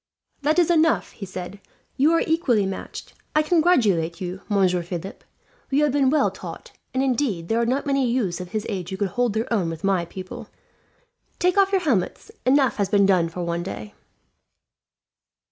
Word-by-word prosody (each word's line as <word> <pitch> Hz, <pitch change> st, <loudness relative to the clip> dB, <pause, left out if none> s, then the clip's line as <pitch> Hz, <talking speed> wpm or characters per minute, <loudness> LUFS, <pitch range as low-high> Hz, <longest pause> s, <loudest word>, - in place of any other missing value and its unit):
"That 305 Hz, +3 st, +1 dB
is 350 Hz, -1 st, +4 dB
enough," 325 Hz, -1 st, +2 dB
he 195 Hz, -, -8 dB
said. 185 Hz, +2 st, -7 dB, 0.3 s
"You 290 Hz, +4 st, +4 dB
are 330 Hz, -, +3 dB
equally 300 Hz, -, +2 dB
matched. 190 Hz, 0 st, -6 dB, 0.2 s
"I 305 Hz, -, +4 dB
congratulate 240 Hz, -, +2 dB
you, 185 Hz, 0 st, -5 dB
Monsieur 185 Hz, -3 st, +2 dB
Philip. 175 Hz, +2 st, -7 dB, 0.5 s
You 280 Hz, +2 st, +2 dB
have 295 Hz, -, +3 dB
been 275 Hz, -1 st, +3 dB
well 305 Hz, +2 st, +2 dB
taught; -, -, -9 dB, 0.2 s
and 260 Hz, -, 0 dB
indeed, 245 Hz, -10 st, -1 dB
there 230 Hz, +1 st, +2 dB
are 235 Hz, -, 0 dB
not 260 Hz, +3 st, 0 dB
many 275 Hz, -3 st, +1 dB
youths 195 Hz, -8 st, -1 dB
of 180 Hz, -, -8 dB
his 215 Hz, +1 st, -3 dB
age 185 Hz, -5 st, -4 dB
who 190 Hz, -, -4 dB
could 200 Hz, -1 st, -1 dB
hold 245 Hz, +3 st, 0 dB
their 225 Hz, +2 st, -1 dB
own 185 Hz, -7 st, +1 dB
with 165 Hz, -1 st, -7 dB
my 190 Hz, -3 st, +1 dB
pupil. 190 Hz, +6 st, -9 dB, 0.9 s
"Take 360 Hz, 0 st, +2 dB
off 395 Hz, -1 st, +4 dB
your 385 Hz, -2 st, +2 dB
helmets. 240 Hz, -, -1 dB, 0.2 s
Enough 270 Hz, 0 st, +3 dB
has 200 Hz, -2 st, 0 dB
been 200 Hz, -1 st, +4 dB
done 180 Hz, -4 st, +3 dB
for 175 Hz, +1 st, -5 dB
one 170 Hz, 0 st, -2 dB
day." 105 Hz, -9 st, -7 dB
215 Hz, 185 wpm, -23 LUFS, 180-280 Hz, 0.9 s, is